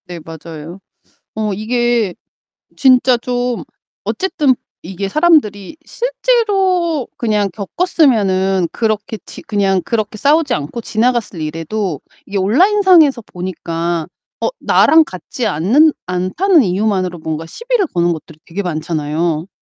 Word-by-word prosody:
네 175 Hz, -1 st, -7 dB
맞아요. 160 Hz, +2 st, -9 dB, 0.6 s
어 215 Hz, -1 st, -1 dB
이게 235 Hz, -1 st, 0 dB, 0.6 s
진짜 255 Hz, -2 st, +4 dB
좀 245 Hz, 0 st, -2 dB, 0.4 s
어쨌든 300 Hz, -8 st, +1 dB, 0.3 s
이게 190 Hz, +3 st, -5 dB
사람들이 300 Hz, -, +2 dB
실제로 395 Hz, -, 0 dB
그냥 210 Hz, -3 st, 0 dB
겪었으면은 195 Hz, -, +1 dB
그렇게 220 Hz, 0 st, -2 dB
지 -, -, -9 dB
그냥 195 Hz, -3 st, 0 dB
그렇게 215 Hz, -2 st, -2 dB
싸우지 290 Hz, +3 st, +2 dB
않고 150 Hz, +11 st, -4 dB
지나갔을 230 Hz, -6 st, 0 dB
일에도 165 Hz, +2 st, -3 dB, 0.3 s
이게 200 Hz, -, -4 dB
온라인 345 Hz, -, +3 dB
상에서 320 Hz, -10 st, +5 dB
보니까 170 Hz, -3 st, -4 dB, 0.3 s
어 -, -, +1 dB
나랑 320 Hz, 0 st, +5 dB
같지 220 Hz, +4 st, -5 dB
않는 230 Hz, -, +3 dB
않다는 220 Hz, -, +2 dB
이유만으로 185 Hz, -2 st, 0 dB
뭔가 160 Hz, 0 st, -4 dB
시비를 470 Hz, -, -1 dB
거는 175 Hz, 0 st, +2 dB
것들이 160 Hz, 0 st, -11 dB
되게 180 Hz, +4 st, -4 dB
많잖아요. 160 Hz, -1 st, -2 dB
210 Hz, 280 characters per minute, -16 LUFS, 175-280 Hz, 0.6 s, 상에서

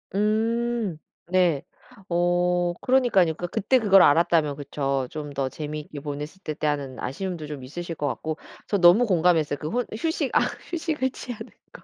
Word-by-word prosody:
음. 220 Hz, -1 st, 0 dB, 0.3 s
네. 175 Hz, -6 st, +2 dB, 0.5 s
어 175 Hz, 0 st, +2 dB
그러니깐요. 240 Hz, -10 st, +3 dB
그러니까 175 Hz, +3 st, -5 dB
그때 235 Hz, +9 st, +2 dB
그걸 195 Hz, -4 st, +6 dB
알았다면 155 Hz, -1 st, +4 dB
그쵸? 140 Hz, -2 st, -2 dB
'좀 150 Hz, -1 st, -6 dB
더 135 Hz, -1 st, -1 dB
재미있게 150 Hz, 0 st, -6 dB
보냈을 150 Hz, +5 st, -6 dB
텐데.' 155 Hz, 0 st, -2 dB
하는 140 Hz, -3 st, -2 dB
아쉬움도 165 Hz, +4 st, -4 dB
좀 145 Hz, -3 st, -7 dB
있으실 165 Hz, +6 st, -6 dB
것 150 Hz, -, -2 dB
같고 155 Hz, +3 st, -3 dB, 0.3 s
저 205 Hz, -, +1 dB
너무 180 Hz, +6 st, +6 dB
공감했어요 165 Hz, -6 st, +2 dB
그 155 Hz, -, -4 dB
혼 245 Hz, +7 st, -1 dB
휴식 320 Hz, 0 st, -1 dB
아 -, -, +5 dB, 0.3 s
휴식을 320 Hz, -6 st, -1 dB
취하는 245 Hz, -4 st, -8 dB, 0.2 s
거. -, -, -13 dB
175 Hz, 335 characters per minute, -25 LUFS, 150-210 Hz, 0.5 s, 그걸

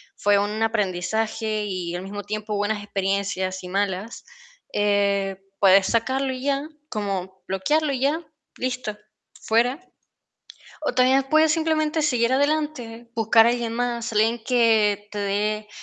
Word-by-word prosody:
fue 205 Hz, 0 st, +3 dB
un 210 Hz, +2 st, -1 dB
aprendizaje 215 Hz, +1 st, -1 dB
y 180 Hz, -3 st, -4 dB
al 180 Hz, +1 st, -4 dB
mismo 205 Hz, +1 st, -6 dB
tiempo 215 Hz, 0 st, -4 dB
buenas 205 Hz, +1 st, -1 dB
experiencias 195 Hz, -2 st, -2 dB
y -, -, -6 dB
malas, 200 Hz, +3 st, -2 dB, 0.5 s
eh, 200 Hz, -2 st, +1 dB, 0.2 s
puedes 195 Hz, -1 st, +6 dB
sacarlo 260 Hz, +4 st, 0 dB
y 255 Hz, 0 st, -6 dB
ya, 280 Hz, +2 st, -1 dB, 0.2 s
como 190 Hz, -3 st, -4 dB
bloquearlo 295 Hz, +11 st, +1 dB
y 260 Hz, -, -2 dB
ya, 305 Hz, +5 st, 0 dB, 0.3 s
listo, 250 Hz, -4 st, -3 dB, 0.4 s
fuera. 240 Hz, +5 st, +1 dB, 1.0 s
O 295 Hz, -5 st, -2 dB
también 260 Hz, +2 st, +4 dB
puedes 310 Hz, +2 st, +4 dB
simplemente 315 Hz, -1 st, +1 dB
seguir 250 Hz, -5 st, +2 dB
adelante, 270 Hz, -5 st, -1 dB
buscar 225 Hz, 0 st, +5 dB
a 235 Hz, -, +4 dB
alguien 235 Hz, -1 st, -2 dB
más, 235 Hz, -1 st, -2 dB
alguien 220 Hz, +2 st, +2 dB
que 220 Hz, -4 st, +2 dB
te 205 Hz, -, -5 dB
dé 210 Hz, +1 st, -1 dB
220 Hz, 135 wpm, -24 LUFS, 200-255 Hz, 1.0 s, puedes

